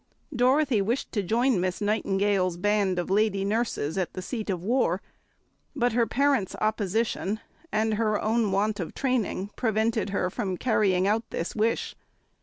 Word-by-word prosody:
Dorothy 255 -1 +3
wished 230 +7 -1
to 205 - 0
join 230 +2 +2
Miss 185 0 -1
Nightingale's 200 -3 +1
band 200 -1 +1
of 175 +1 -2
lady 200 -1 +2
nurses 200 -6 -1
at 180 - -2
the 185 - -5
seat 215 +2 -4
of 180 -3 -2
war, 215 -5 +1 0.8
but 245 -4 +1
her 235 -1 +2
parents' 270 -6 +1
opposition 215 0 0 0.3
and 220 +1 +1
her 215 -1 +1
own 220 -1 +1
want 205 +2 0
of 175 - -5
training 235 -6 -1
prevented 220 -2 0
her 185 -2 -1
from 190 -4 -3
carrying 195 -6 +2
out 225 +3 0
this 170 - -4
wish. 220 +2 0
215 Hz, 155 wpm, -27 LUFS, 195-230 Hz, 0.8 s, Dorothy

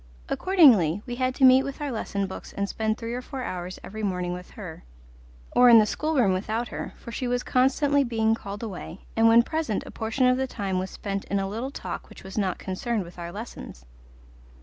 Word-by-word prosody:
Accordingly, 225 - +5
we 245 -1 -5
had 255 0 0
to 270 - +5
meet 260 0 +8
with 275 0 -6
our 290 -2 -3
lesson 200 -3 -2
books 190 - -8
and 200 0 -2
spend 220 +1 -1
three 230 0 -5
or 250 - -3
four 260 0 -6
hours 180 -3 -5
every 220 +2 -7
morning 180 -3 -1
with 180 0 -8
her, 180 -7 -8 0.7
or 245 0 +6
in 235 - +10
the 215 - +6
schoolroom 260 -4 +1
without 220 +5 -2
her, - - -6
for 235 - -10
she 250 +2 -3
was 245 0 0
constantly 280 +2 +3
being 225 -3 +1
called 205 -1 -6
away, 195 -3 -7
and 225 0 +5
when 230 +1 +7
present 315 -7 -2
a - - -9
portion 225 +4 0
of 250 0 +4
the 265 0 -1
time 195 -6 -2
was 185 +1 -3
spent 195 -1 -4
in 200 - -1
a 195 0 -1
little 225 +7 -4
talk 280 - -6
which - - -13
was 190 0 -9
not 190 -4 0
concerned 205 +3 -2
with 175 0 -12
our 170 0 -5
lessons. 200 - -9
220 Hz, 215 wpm, -26 LUFS, 195-255 Hz, 0.7 s, in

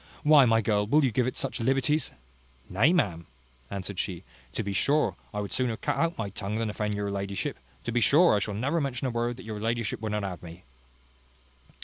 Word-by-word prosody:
Why, 150 -3 +7
my 115 -1 +4
girl, 105 -1 +1
will 145 +5 +4
you 130 - +1
give 125 +2 +1
it 130 - -3
such 135 - -2
liberties?" 135 +4 +1 0.6
"Nay, 115 - +3
ma'am," 90 - 0 0.4
answered 100 -1 -5
she, 90 -3 -3 0.3
"to - - -2
be 100 -1 -3
sure, 140 +11 +2 0.2
I 105 - -4
would 100 - -5
sooner 125 -3 0
cut - - -1
out 165 0 0
my 100 -3 -3
tongue 100 +1 -4
than 110 -1 -1
offend 105 0 -2
your 100 0 -2
ladyship. 100 -1 -3 0.2
To 120 - -3
be 120 +1 +1
sure 160 +6 +6
I - - +2
shall 100 0 -3
never 140 +10 0
mention 135 -2 -2
a 130 - 0
word 120 +1 -1
that 125 - -10
your 110 -1 -5
ladyship 115 0 -2
would 110 -1 -3
not 105 -1 -1
have 95 -3 -5
me." 85 +1 -11
115 Hz, 220 wpm, -28 LUFS, 100-130 Hz, 0.6 s, Why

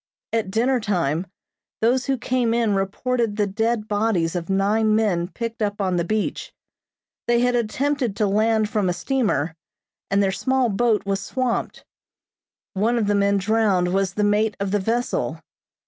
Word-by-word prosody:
At 225 -4 0
dinner 245 +5 +1
time 180 -5 -1 0.5
those 250 +3 +1
who 270 -1 +1
came 245 -1 0
in 230 -3 +2
reported 210 +3 -1
the 210 -1 +1
dead 220 +2 -1
bodies 205 -6 0
of 170 0 -4
nine 210 +3 +2
men 190 -6 +1
picked 230 +3 -6
up 205 -1 -1
on 185 -3 0
the 170 - +1
beach. 215 +4 -2 0.8
They 240 0 +3
had 245 0 +2
attempted 245 0 -1
to 215 - +1
land 215 +2 +2
from 205 -3 0
a - - +1
steamer, 200 - -1 0.5
and 200 +1 +2
their 195 - +1
small 260 +4 +1
boat 220 0 +1
was 195 0 -1
swamped. 255 +1 -2 0.9
One 220 +5 +1
of 225 - +1
the 205 - +1
men 200 0 +2
drowned 195 -3 +1
was 195 -1 0
the 210 - 0
mate 210 +1 +1
of 200 -1 -2
the 205 - +2
vessel. 230 +5 -1
215 Hz, 165 wpm, -22 LUFS, 195-235 Hz, 0.9 s, They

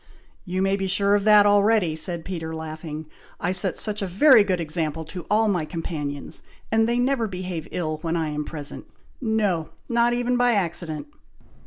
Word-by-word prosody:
"You 185 0 -1
may 195 0 +2
be 195 -1 -2
sure 200 +2 +2
of 205 0 +2
that 210 -1 +7
already!" 205 -4 +3
said 165 +1 -1
Peter, 160 -3 -5
laughing. 160 0 -6 0.3
"I 175 - 0
set 185 0 0
such 210 -1 -1
a 195 - -1
very 220 +5 +6
good 185 -3 0
example 160 -1 -2
to 175 +2 -8
all 220 +1 +3
my 180 -6 +1
companions, 150 -3 -5 0.3
that 225 0 +3
they 235 +1 +1
never 245 -2 +1
behave 180 -4 -5
ill 155 -3 -2
when 165 -1 -1
I 160 -2 -1
am 150 0 -3
present, 150 -1 -5 0.4
no! 210 -9 0 0.2
not 235 0 +3
even 245 +1 0
by 245 -1 +3
accident! 170 - -2
185 Hz, 180 wpm, -24 LUFS, 160-210 Hz, 0.4 s, that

